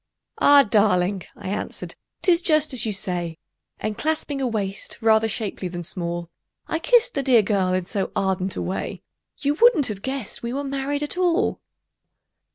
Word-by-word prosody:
"Ah! 285 0 +7
darling," 200 - +2
I 200 -2 -7
answered, 205 - -5 0.3
"'tis 350 -2 +4
just 310 -4 +3
as 240 -3 +2
you - - 0
say;" 175 -4 -1 0.4
And 215 -1 -4
clasping 305 -3 -1
a 260 - +1
waist 200 -4 -3
rather 220 -1 +4
shapely 205 -3 -3
than 175 0 -6
small, 170 0 -4 0.4
I 320 - -1
kissed 485 +6 +3
the - - -1
dear 250 -5 +4
girl 195 -3 +1
in 185 -1 -1
so 195 0 -2
ardent 190 -1 0
a - - -3
way 185 - -4 0.4
You 285 0 +1
wouldn't 465 - +6
have 200 -2 -5
guessed 265 -3 -4
we 235 +1 -4
were 280 +2 -2
married 275 +1 -2
at 295 +5 -3
all! 360 +3 +1
220 Hz, 170 wpm, -23 LUFS, 190-285 Hz, 0.4 s, Ah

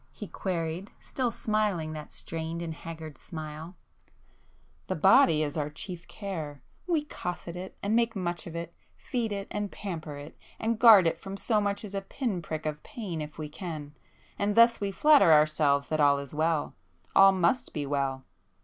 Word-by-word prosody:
he 210 - -8
queried, 180 0 -3
still 255 -2 -2
smiling 210 -8 -1
that 155 -1 -8
strained 165 +1 -4
and 165 -1 -4
haggard 160 -1 -9 1.7
smile—"The - - 0
body 160 - +5
is 145 -1 -3
our 150 -2 -1
chief 175 +3 -8
care,—we 195 - -4
cosset 180 - -5
it, 185 +1 -8
and 205 +2 +1
make 230 -1 +2
much 175 -3 -3
of 170 - -8
it, 170 0 -5 0.2
feed 235 -4 -3
it 200 -1 -3
and 210 -1 -3
pamper 160 -7 -6
it, 145 +2 -10 0.2
and 225 0 -1
guard 220 -6 +9
it 165 0 +1
from 195 +2 -7
so 215 +1 +1
much 205 +1 -1
as 200 - -8
a 195 - -2
pin 195 -1 -3
prick 155 -2 -5
of 150 -1 -3
pain 185 -9 -6
if 150 0 -7
we 155 -1 -4
can,—and 155 - -6
thus 230 0 +6
we 200 - 0
flatter 285 - +6
ourselves 150 -2 +4
that 155 - 0
all 145 -1 +5
is 140 0 -7
well,—all 150 - +2
must 190 +6 +1
be 145 -2 -3
well! 135 -2 -1
170 Hz, 165 wpm, -28 LUFS, 155-205 Hz, 1.7 s, guard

